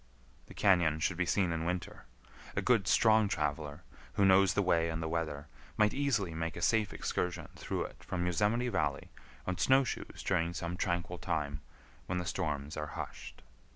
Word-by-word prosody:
The - - -13
cañon 85 -6 +3
should 85 +2 0
be 90 -1 0
seen 95 -2 +2
in 80 -1 -2
winter. 90 0 -4 0.5
A - - +1
good, 115 -7 +3
strong 110 -1 +5
traveler, 75 -2 -2 0.3
who 100 - +3
knows 95 0 +5
the 100 - +3
way 85 -2 +2
and 80 0 -3
the 80 - -2
weather, 80 -3 -2 0.3
might 105 0 +4
easily 115 -11 0
make 80 0 -3
a 85 - -6
safe 110 0 +2
excursion 90 -1 -2
through - - -3
it - - -10
from 90 -1 -2
Yosemite 105 +8 +1
Valley 75 -9 -1 0.3
on 90 -1 -2
snow 135 +1 +5
shoes 125 - -5
during 85 -2 +1
some 85 0 -3
tranquil 90 0 -2
time, 75 -5 -2 0.5
when 90 - -1
the 90 - -2
storms 75 -5 -2
are 75 0 -3
hushed. - - -7
90 Hz, 180 wpm, -32 LUFS, 80-100 Hz, 0.5 s, strong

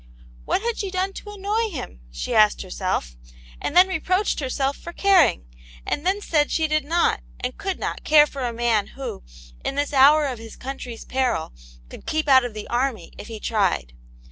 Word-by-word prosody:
"What 395 - 0
had 470 -1 -2
she 400 - -2
done 375 +1 -1
to 415 - -9
annoy 415 +3 -1
him 265 - -7
} - - -24
" - - -24
she - - -2
asked 215 -1 +4
herself, 185 - -3 0.5
and 320 - -1
then 365 +1 +8
reproached 370 +2 0
herself 270 0 -1
for 340 - -10
caring, 370 - +4 0.4
and 290 - -2
then 395 +2 +1
said 300 -6 +1
she 320 -1 +1
did 305 -1 +1
not 335 +4 +1 0.2
and 250 0 -3
could 385 -2 -3
not - - -4
care 300 -1 +6
for 280 -2 -8
a 240 - -1
man 230 -3 +1
who, 270 - -5 0.4
in 275 - -2
this 290 +1 -1
hour 290 +3 +6
of 255 -4 -3
his 225 -1 -10
country's 255 -3 -7
peril, 255 -11 -1 0.3
could - - -13
keep 310 -1 -1
out 260 -2 +7
of 240 -3 -5
the 215 - -6
army 250 -1 -2
if - - -8
he 225 -2 -7
tried. 190 - 0
275 Hz, 200 wpm, -23 LUFS, 230-350 Hz, 0.5 s, then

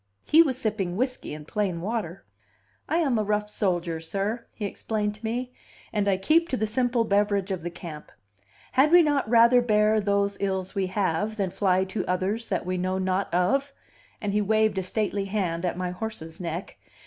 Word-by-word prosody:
He 320 - +7
was 270 -6 +1
sipping 205 -6 -2
whiskey 255 +2 -1
and 150 0 -8
plain 195 -4 -1
water. 195 -2 -4 0.6
"I 325 - +2
am 275 -9 +2
a - - +1
rough 210 0 0
soldiers 170 -5 -1
sir," 210 +4 -2
he 210 - -4
explained 210 +1 -2
to 210 +2 -17
me, 245 +3 -3 0.4
"and 205 -1 0
I 195 -2 +3
keep 325 - +3
to 260 - -1
the 220 - 0
simple 240 +2 +1
beverage 200 -2 +1
of 185 -3 -2
the 175 - -4
camp. 170 -3 -9 0.6
Had 275 +4 +4
we 350 0 +8
not 290 -7 +1
'rather 235 +1 +6
bear 215 -2 +3
those 200 0 +1
ills 190 -1 -2
we 195 -2 0
have 205 +2 -1
than 195 -3 -1
fly 190 -1 +2
to 190 +1 -3
others 195 +5 -1
that 185 -4 -2
we 185 0 -2
know 185 +1 -1
not 185 0 -1
of'?" 270 +11 +1 0.5
And 205 -3 -2
he 210 - +2
waved 215 -1 +2
a - - 0
stately 200 +1 -1
hand 185 -4 -1
at 175 - -1
my 180 -1 -2
horse's 180 -5 -6
neck. 175 +1 -5
205 Hz, 195 wpm, -26 LUFS, 185-225 Hz, 0.6 s, we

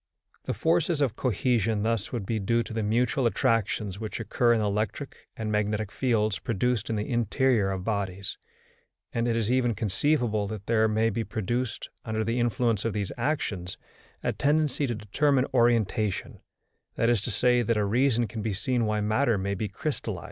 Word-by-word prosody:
The - - -2
forces 165 -1 +1
of 135 -6 +1
cohesion 115 -3 +1
thus 115 -2 -1
would 115 -6 -3
be 110 +2 -1
due 115 +4 +1
to 110 - -8
the 110 - -1
mutual 120 +4 +1
attractions 110 -4 0
which 110 +1 -5
occur 120 +2 +2
in 115 - +3
the 105 - 0
electric 105 0 -3
and 110 -1 -3
magnetic 105 0 0
fields 110 -6 +1
produced 120 -1 -1
in 115 - 0
the 105 0 -2
interior 120 -2 +2
of 95 -1 -3
bodies; 100 -2 -3 0.7
and 115 0 0
it 115 - +1
is 115 0 0
even 125 -3 +2
conceivable 110 +1 +1
that 105 -1 -6
there 110 -1 +3
may 110 +1 +2
be 115 +2 -1
produced, 120 +3 -3
under 110 0 -1
the 115 +3 -1
influence 115 -2 +1
of 115 - -1
these 100 -3 -2
actions, 110 - -2 0.5
a - - 0
tendency 150 -1 +1
to 120 - -2
determine 130 +6 +1
orientation, 115 -4 +1 0.6
that 115 - +1
is 120 -4 +3
to 120 - -4
say, 125 +2 +3
that 115 -1 +1
a 105 - +2
reason 120 +2 +2
can 110 0 -5
be 105 -1 -1
seen 120 +3 0
why 105 0 0
matter 110 +2 +2
may 100 +1 -1
be 105 +2 -2
crystallised. 110 - -3
115 Hz, 185 wpm, -27 LUFS, 105-120 Hz, 0.7 s, in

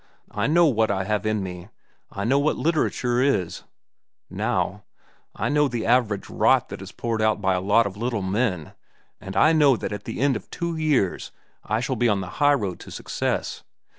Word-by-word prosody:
I 105 +3 -1
know 170 +3 +5
what 115 -7 +2
I 95 -1 0
have 105 +1 -1
in 110 -2 0
me; 90 0 -7 0.4
I 100 - -5
know 130 +6 +3
what 150 +2 +1
literature 130 -6 0
is, 100 -11 0 0.7
now; - - -1 0.5
I - - -2
know 150 0 +3
the 120 -4 -3
average 110 -4 +1
rot - - +2
that - - -7
is - - -9
poured 115 -2 -3
out 110 -1 +2
by 95 -1 +1
a 90 - -1
lot 105 +5 +3
of 100 0 -5
little 115 -2 -2
men; 95 -4 -1 0.5
and 95 0 -7
I 155 +10 +5
know 145 -5 +5
that - - -4
at 105 0 -7
the - - -5
end 135 0 +2
of 105 - -7
two 170 -1 -3
years 150 - 0 0.3
I - - -1
shall - - -2
be 120 -1 +2
on 100 -2 +1
the 90 +8 -7
highroad 130 -11 +2
to - - -11
success. - - -3
110 Hz, 195 wpm, -24 LUFS, 100-140 Hz, 0.7 s, know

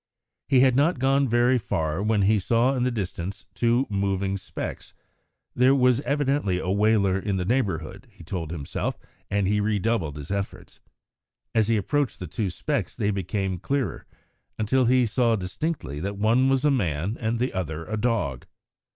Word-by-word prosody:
He 130 -2 +5
had 130 -2 +4
not 150 +5 +3
gone 135 +2 +2
very 120 +2 +3
far 80 -4 -2
when 105 -1 +2
he 105 +2 +4
saw 115 +6 +2
in 125 - -1
the 125 - +2
distance 100 -3 -4
two 120 +3 +2
moving 100 -1 -1
specks. 100 - -6 0.6
There 130 +2 +4
was 125 -1 +3
evidently 140 -9 0
a 90 +1 -2
whaler 100 -2 +3
in 100 -1 -2
the 90 - -2
neighbourhood, 95 - -1
he - - -15
told 80 -1 -4
himself, 75 -4 -3 0.3
and 100 -1 +1
redoubled 105 -5 0
his 75 +4 -7
efforts. 100 -1 -5 0.7
As 110 -2 +3
he 115 -1 +2
approached 145 +6 0
the 90 - -5
two 95 +5 -2
specks - - -2
they 105 0 0
became 95 -1 -2
clearer, 135 +7 -2 0.5
until 125 +4 +2
he 125 +1 +4
saw 115 +1 +2
distinctly 95 - -3
that 100 +5 -4
one 115 +6 +3
was 135 +1 +2
a 150 - +4
man 95 - 0
and 115 0 -1
the 125 +3 -1
other 85 -3 -3
a 110 - -3
dog. 105 - -1
105 Hz, 170 wpm, -25 LUFS, 95-125 Hz, 0.7 s, He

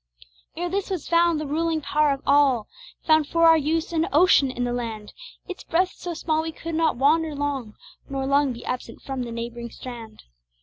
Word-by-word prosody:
Ere 350 +1 -2
this 390 +3 -2
was 365 -6 -4
found, 335 -1 +3
the 305 - -4
ruling 320 +2 0
power 300 0 +1
of 275 0 -3
all 275 -6 +3 0.4
Found 315 -2 +4
for 335 +2 +1
our 325 0 +8
use 320 +2 -1
an 325 +1 +1
ocean 305 -5 +5
in 250 -1 -3
the 245 0 -1
land, 225 -3 -5 0.3
Its 370 -2 -7
breadth 365 +3 +1
so 350 -2 -6
small 315 -1 0
we 320 0 -4
could 330 +1 -7
not 320 -4 +1
wander 305 +3 +2
long, 280 -6 -3 0.3
Nor 270 -1 -3
long 280 0 +2
be 235 - -9
absent 250 - -5
from 270 -2 -4
the 240 -1 -5
neighboring 235 0 -6
strand. 230 -3 -10
295 Hz, 200 wpm, -24 LUFS, 250-330 Hz, 0.4 s, our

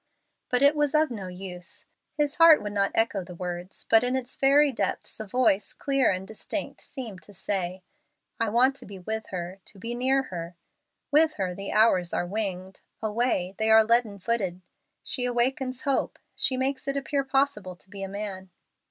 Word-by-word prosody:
But 250 +2 +2
it 285 +2 +6
was 295 0 +1
of 305 -2 +3
no 200 -5 -5
use. 180 -1 -7 0.3
His 295 -1 0
heart 330 -1 +8
would 205 - -4
not 200 -1 +2
echo 220 -4 +2
the 180 0 -10
words, 180 +1 -6
but 225 0 +6
in 250 +1 0
its 260 -1 -4
very 280 +2 +4
depths 230 - -3
a 220 - -5
voice 210 -3 +2
clear 275 -3 +1
and 185 0 -2
distinct 220 - -5
seemed 225 - -8
to 185 +6 -14
say, 185 -1 -3 0.6
"I 230 -1 +1
want 250 +5 +4
to - - -11
be 200 -1 -9
with 220 +4 -4
her 180 +1 -6
to 205 - -9
be 230 +5 -4
near 260 +2 +2
her. 175 -6 -7 0.6
With 310 +1 +4
her, 185 -2 -2
the 195 +2 -6
hours 190 -5 +3
are - - 0
winged; 190 -1 -4 0.2
away, 215 -4 0
they 220 0 +2
are 220 0 +8
leaden 230 -3 +2
footed. 190 -4 -1 0.4
She 250 - -1
awakens 255 +1 0
hope, 275 -1 0 0.2
she 260 - +2
makes 265 +1 -1
it 275 0 0
appear 275 0 -1
possible 270 -9 0
to 180 - -15
be 195 +1 -8
a 195 - -4
man." 195 -2 -6
220 Hz, 185 wpm, -27 LUFS, 190-260 Hz, 0.6 s, heart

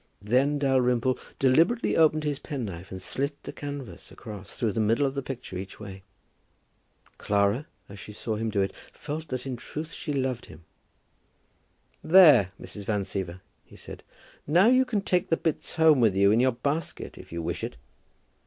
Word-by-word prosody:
Then 130 +7 +2
Dalrymple 130 -2 +2 0.2
deliberately 165 - +3
opened 155 -1 +4
his 145 -2 -2
penknife 100 - -6
and 95 - -7
slit 140 +9 -3
the - - -7
canvas 145 -3 -7
across, 105 -4 -9
through 115 -3 0
the 105 - -3
middle 115 +6 +2
of 135 - -1
the 140 - -2
picture 125 -8 -6
each 95 0 -9
way. 100 -2 -9 1.2
Clara, 100 +8 +1 0.2
as 100 0 -11
she 105 - -9
saw 110 +1 -4
him 110 +1 -2
do 100 -2 0
it, 95 - -2 0.2
felt 155 +2 -6
that 130 -2 -4
in 130 -2 -4
truth 155 +6 -7
she 150 - -5
loved 130 -3 -2
him. 80 +2 -14 1.4
"There, 155 - +7
Mrs. 100 -1 -7
Van 105 -1 0
Siever," 95 -2 -5 0.2
he - - -18
said; - - -10 0.5
"now 170 +7 +5
you 255 +2 +5
can 225 -5 -1
take 185 -1 0
the 165 - +2
bits 160 -2 -2
home 160 -4 +5
with 110 -5 +3
you 100 +1 +5
in 110 - +4
your 130 0 +3
basket 145 +7 -3
if - - -13
you 85 0 -4
wish - - -3
it." - - -4
130 Hz, 180 wpm, -27 LUFS, 105-150 Hz, 1.4 s, There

